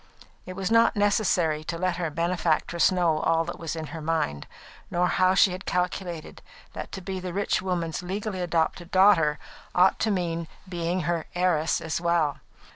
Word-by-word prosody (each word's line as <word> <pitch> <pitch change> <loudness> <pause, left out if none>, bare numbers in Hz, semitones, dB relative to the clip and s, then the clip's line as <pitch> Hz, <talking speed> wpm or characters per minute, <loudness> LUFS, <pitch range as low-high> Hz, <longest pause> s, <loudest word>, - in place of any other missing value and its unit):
It 185 - -5
was 195 +1 -3
not 230 0 +5
necessary 190 -7 +2
to 170 - -3
let 180 0 -1
her 170 -3 -1
benefactress 170 +1 +1
know 170 -4 +2
all 165 +1 +1
that 175 - -6
was 165 -1 -4
in 160 -1 -4
her 165 - -6
mind, 155 - -1 0.4
nor 175 +1 +1
how 185 +1 +3
she 190 - +5
had 185 +1 -7
calculated 180 -2 -3 0.3
that - - -7
to 190 - -5
be 190 +1 -4
the 180 -1 -5
rich 200 +2 0
woman's 175 -4 -2
legally 190 +1 -4
adopted 170 0 -1
daughter 185 -6 +4 0.4
ought 185 +2 +4
to 220 - +1
mean 170 -4 -1 0.2
being 175 0 -2
her 170 0 -2
heiress 175 -3 +1
as 160 +1 -3
well. 170 -4 +1
175 Hz, 175 wpm, -26 LUFS, 165-185 Hz, 0.4 s, not